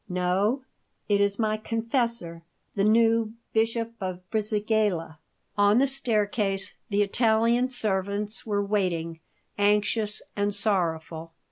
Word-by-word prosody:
"No; 185 +8 0 0.4
it 205 -1 +2
is 200 0 +1
my 215 -1 0
confessor, 225 -6 -2 0.3
the 200 - 0
new 225 +1 +3 0.2
Bishop 230 +1 0
of 185 -1 -5
Brisighella." 210 -6 0 0.4
On 205 +2 +5
the 270 - +5
staircase 210 -7 0 0.2
the 205 0 +2
Italian 230 +3 +2
servants 205 -2 0
were 205 -2 -1
waiting, 170 -5 -1 0.4
anxious 210 +1 +1
and 205 0 +1
sorrowful. 165 -5 -1
210 Hz, 110 wpm, -26 LUFS, 195-225 Hz, 0.4 s, On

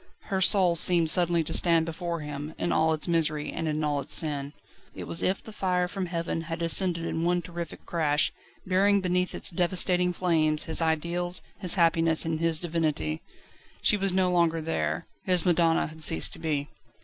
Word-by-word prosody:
Her 190 -1 0
soul 185 -2 +4
seemed 170 -1 +4
suddenly 175 -1 +2
to - - -5
stand 165 -2 +3
before 170 0 -5
him 150 +1 -7
in - - -2
all 160 0 +2
its 155 +1 -2
misery 155 -3 0
and 165 - -4
in 155 0 -2
all 145 -1 -1
its 140 - 0
sin. 145 -2 -1 0.4
It - - -7
was 165 - -3
as - - +1
if 190 - -4
the 220 - -11
fire 180 -3 -1
from 190 0 -5
heaven 165 -1 -3
had 165 0 -6
descended 170 0 +1
in 165 - -3
one 175 0 0
terrific 170 -1 -8
crash, 150 -3 0 0.3
burying 195 +2 +2
beneath 180 0 -1
its - - +1
devastating 180 +1 0
flames 160 -4 +1
his 160 - +5
ideals, 170 +2 -1 0.2
his 180 -2 +5
happiness, 165 -2 +3
and 160 -1 -2
his 165 -1 0
divinity. 155 - -2 0.6
She - - +3
was 195 -1 0
no 185 0 +1
longer 170 -2 +1
there. 80 - -3 0.2
His 180 -2 +1
madonna 170 -2 +2
had 160 +1 -11
ceased 80 - +3
to - - -7
be. 150 -3 -2
165 Hz, 190 wpm, -26 LUFS, 155-180 Hz, 0.6 s, his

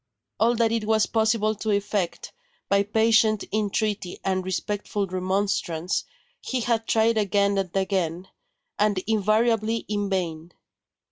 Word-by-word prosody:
All 235 +2 +3
that 225 -1 +2
it 225 -2 -1
was 220 0 +3
possible 220 -1 +1
to 220 +1 -5
effect, 200 -3 -1 0.4
by 200 0 +4
patient 220 0 +3
entreaty 210 -3 -1
and 185 -1 0
respectful 205 +2 -2
remonstrance, 185 -2 -1 0.3
he 255 -1 -3
had 225 -1 0
tried 225 0 +3
again 200 0 +2
and 190 -2 -2
again, 185 -2 -1 0.5
and 210 -1 +2
invariably 220 +1 +1
in 205 -1 -2
vain. 170 -3 -3
205 Hz, 125 wpm, -25 LUFS, 190-220 Hz, 0.5 s, by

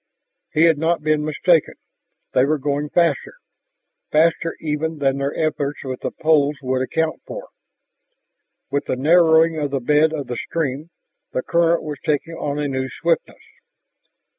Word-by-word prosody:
He 155 - +3
had 165 -3 +4
not 165 0 0
been 155 -1 +1
mistaken; 155 +2 +2 0.6
they 130 - +4
were 150 +3 +2
going 145 +1 -2
faster, 165 -5 +1 0.8
faster 165 +2 +2
even 160 +1 -2
than 140 -1 0
their 140 +1 -2
efforts 150 -2 -2
with 130 -2 -5
the - - -2
poles 150 -2 +2
would 130 0 0
account 160 +4 -1
for. - - -8 1.2
With 140 +1 -1
the - - -1
narrowing 160 +2 +4
of 145 -1 -1
the 135 0 -1
bed 150 +5 +3
of 150 -3 -4
the 120 - -5
stream, 150 +1 -3 0.4
the 130 - -1
current 170 0 +2
was 150 -3 -6
taking 155 +2 -1
on 145 -3 -3
a 150 -1 -1
new 130 -1 -2
swiftness. 165 +4 -2
150 Hz, 155 wpm, -21 LUFS, 140-160 Hz, 1.2 s, had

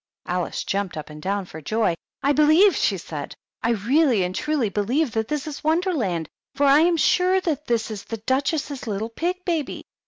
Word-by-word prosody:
Alice 180 -1 -2
jumped 195 -4 -2
up 155 0 -7
and 150 0 -10
down 195 +2 -1
for 160 -2 -10
joy. 215 +4 +1 0.3
"I 280 - +3
believe," 310 +6 +5
she 195 - +1
said, 155 -4 -7 0.3
"I - - 0
really 235 - +3
and 180 0 -2
truly 300 +1 0
believe 235 - 0
that 220 0 -1
this 300 +1 -2
is 305 -2 -7
Wonderland, 305 - 0 0.3
for 285 - +2
I 280 +1 +6
am 335 +1 +3
sure 365 +3 +3
that 305 -6 -3
is 220 -3 -1
the 225 - -5
Duchess's 270 +3 -1
little 215 +1 -2
pig 360 +9 -3
baby." 330 -6 -2
250 Hz, 185 wpm, -23 LUFS, 200-310 Hz, 0.3 s, I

